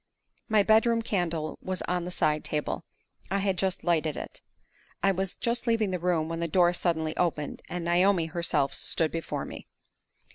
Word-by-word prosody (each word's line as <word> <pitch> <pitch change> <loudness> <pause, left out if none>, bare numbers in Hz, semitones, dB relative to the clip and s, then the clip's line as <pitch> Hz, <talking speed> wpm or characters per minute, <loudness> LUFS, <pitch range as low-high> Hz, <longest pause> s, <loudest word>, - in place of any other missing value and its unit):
My 215 -2 +5
bedroom 225 +2 +4
candle 170 -7 -2
was 185 -1 -2
on 180 -1 -1
the - - -4
side 150 -4 +1
table; 150 -1 -2 0.5
I 195 - +1
had 195 -1 +1
just 190 0 -1
lighted 160 -3 +1
it. - - -7 0.6
I 195 - +5
was 190 0 -1
just 240 +1 -1
leaving 225 -4 +2
the 180 - -1
room, 170 -2 +1
when 165 0 -4
the 170 - 0
door 175 +1 +4
suddenly 160 -3 0
opened, 155 -4 -1
and 175 -1 -4
Naomi 175 0 +3
herself 160 -4 0
stood 160 -2 0
before 165 0 -3
me! - - -9
175 Hz, 175 wpm, -28 LUFS, 165-195 Hz, 0.6 s, My